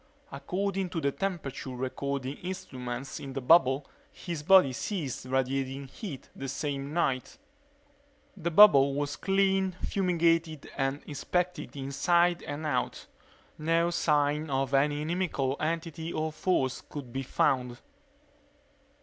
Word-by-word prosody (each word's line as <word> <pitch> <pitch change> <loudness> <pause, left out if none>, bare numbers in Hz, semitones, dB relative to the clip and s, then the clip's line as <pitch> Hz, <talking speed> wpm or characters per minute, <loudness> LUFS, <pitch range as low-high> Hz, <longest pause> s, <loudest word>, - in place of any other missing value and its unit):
According 195 0 -2
to 165 - -3
the 140 -3 +1
temperature 165 -8 -4
recording 130 +2 -3
instruments 130 -8 -6
in 135 -1 -7
the 135 - -2
bubble 135 -1 +4 0.3
his 170 -4 -6
body 165 -4 +6
ceased 140 - -4
radiating 135 +1 -1
heat 145 - -8
that 135 - -5
same 140 0 -3
night. 150 - -1 1.0
The 170 -3 -2
bubble 140 -7 +7
was 145 0 -2
cleaned, 195 0 +1
fumigated, 165 -5 0
and 135 +1 -1
inspected 180 +5 -2
inside 170 +6 +2
and 145 +2 -5
out. 130 -5 -1 0.5
No 165 +2 +2
sign 150 -1 +1
of 135 0 -1
any 145 +2 +2
inimical 155 -5 -1
entity 165 0 -3
or 155 -1 -2
force 155 -5 0
could 130 -5 -9
be 135 - -2
found. 125 -1 0
145 Hz, 120 wpm, -29 LUFS, 135-175 Hz, 1.0 s, bubble